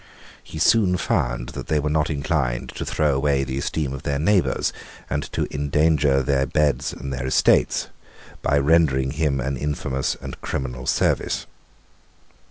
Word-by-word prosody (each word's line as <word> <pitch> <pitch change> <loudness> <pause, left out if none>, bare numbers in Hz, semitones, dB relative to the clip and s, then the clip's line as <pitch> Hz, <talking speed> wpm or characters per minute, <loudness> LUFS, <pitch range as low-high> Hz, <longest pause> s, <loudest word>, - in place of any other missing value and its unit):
He - - -9
soon 90 +2 +4
found - - -1
that - - -7
they 75 - +1
were 75 - -2
not 80 +1 +1
inclined 70 -4 -1
to - - -6
throw 75 -2 +1
away 70 0 +1
the 65 0 -3
esteem 70 -1 -2
of 70 - -6
their 70 -1 -1
neighbours, 90 +5 +1 0.4
and - - 0
to - - -1
endanger 75 -1 +2
their 70 0 +1
beads 75 +1 +1
and 70 0 -6
their 65 +1 -3
estates, 65 - +3 0.5
by 70 - +2
rendering 70 -3 +3
him 75 -2 0
an 70 +2 -2
infamous 70 -2 -2
and - - -8
criminal 65 -1 -4
service. - - +1
70 Hz, 155 wpm, -23 LUFS, 65-75 Hz, 0.5 s, soon